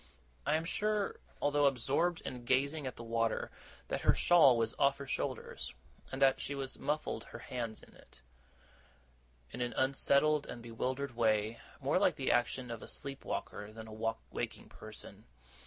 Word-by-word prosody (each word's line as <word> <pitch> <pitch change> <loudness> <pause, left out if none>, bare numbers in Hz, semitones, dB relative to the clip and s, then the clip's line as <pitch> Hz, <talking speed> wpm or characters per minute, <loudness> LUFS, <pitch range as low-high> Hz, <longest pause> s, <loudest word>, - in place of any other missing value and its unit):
I 150 - +4
am 160 +1 0
sure, 210 +3 0 0.2
although 145 0 +4
absorbed 140 +7 +1
in 125 -1 -6
gazing 140 +4 +1
at 130 - -5
the 115 - -8
water, 115 0 0 0.4
that - - -1
her - - +5
shawl 155 -8 +7
was 115 -1 +1
off 140 0 +4
her 140 - -6
shoulders, 130 - -3 0.4
and 130 - -4
that 135 -1 +5
she 140 - -3
was 135 -1 -4
muffling 150 +1 -1
her - - -8
hands 120 -2 -5
in - - -16
it, - - -19 1.3
in 125 - -5
an 120 -1 -1
unsettled 140 +2 +3
and 120 - -7
bewildered 130 +3 -3
way, 110 0 +2 0.2
more - - +2
like - - +4
the - - +1
action 120 0 +1
of 115 - -5
a - - -8
sleep 135 -1 -5
walker 105 +1 -4
than 110 0 -9
a 110 - -9 0.4
waking - - -4
person. - - -12
130 Hz, 170 wpm, -34 LUFS, 115-140 Hz, 1.3 s, shawl